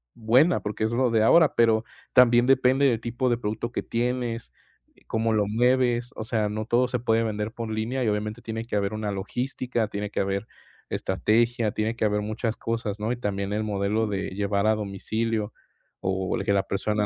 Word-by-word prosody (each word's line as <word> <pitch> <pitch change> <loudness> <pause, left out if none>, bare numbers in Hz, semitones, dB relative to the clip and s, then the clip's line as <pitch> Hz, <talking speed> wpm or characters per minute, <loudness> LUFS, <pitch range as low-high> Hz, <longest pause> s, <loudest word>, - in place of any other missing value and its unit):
buena 125 +10 +3
porque 105 +1 -3
es 110 - +1
lo 125 0 +1
de 110 -1 +3
ahora, 160 +6 +5
pero 115 -1 +4 0.3
también 120 -1 +6
depende 135 +1 +4
del 115 -4 +1
tipo 120 +2 -1
de 120 - +2
producto 110 +1 -3
que - - -3
tienes, 120 -1 -2 0.6
cómo 110 0 0
lo 105 -1 +2
mueves, 120 +1 +2
o 110 - -3
sea, 110 -2 0
no 110 +1 -3
todo 120 +2 +2
se 125 - 0
puede 115 -1 +2
vender 105 -1 -2
por 115 -2 -5
línea 115 +4 -2
y 115 - 0
obviamente 105 +2 -2
tiene 115 0 -5
que 115 - -4
haber 100 0 0
una 105 -1 -2
logística, 120 +3 -2
tiene 105 -1 -4
que - - -2
haber 100 +2 -2 0.4
estrategia, 110 +4 +1
tiene 110 +2 -1
que 110 - 0
haber 105 0 +1
muchas 110 +2 -3
cosas, 115 -3 -3
¿no?, 110 +3 -1
y - - -5
también 100 -3 -2
el 105 +1 -1
modelo 105 +1 0
de 100 -1 -2
llevar 100 +1 0
a 110 - +5
domicilio, 110 +2 -2 0.5
o 95 0 -1
que - - +1
la 100 -1 +2
persona 105 +2 -1
110 Hz, 195 wpm, -25 LUFS, 105-120 Hz, 0.6 s, también